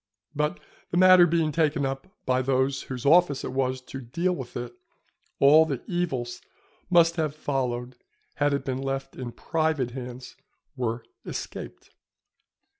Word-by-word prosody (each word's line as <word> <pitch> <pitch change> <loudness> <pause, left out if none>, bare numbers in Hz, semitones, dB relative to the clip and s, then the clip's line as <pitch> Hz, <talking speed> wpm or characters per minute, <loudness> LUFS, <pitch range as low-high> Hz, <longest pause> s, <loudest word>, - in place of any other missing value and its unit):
But 150 +1 0 0.3
the 175 - -1
matter 185 -1 +8
being 160 -2 +1
taken 150 -2 +1
up 135 +4 -4 0.2
by 130 -1 +2
those 130 +1 +1
whose 125 -1 -7
office 155 -2 +4
it - - -4
was 130 -1 -1
to 135 +1 -8
deal 170 +10 -1
with 130 -7 -6
it, 120 0 -5 0.6
all 150 +3 +7
the 140 -6 -3
evils 135 -9 -2
which - - -35 0.4
must 170 -1 +5
have 155 -2 -1
followed 125 -4 -2 0.4
had 145 0 +2
it 140 -1 -1
been 130 0 -2
left 135 0 -3
in 125 -2 -6
private 155 -4 -1
hands 125 0 -8 0.4
were 115 -2 -2 0.2
escaped. - - -7
135 Hz, 150 wpm, -26 LUFS, 130-160 Hz, 0.6 s, matter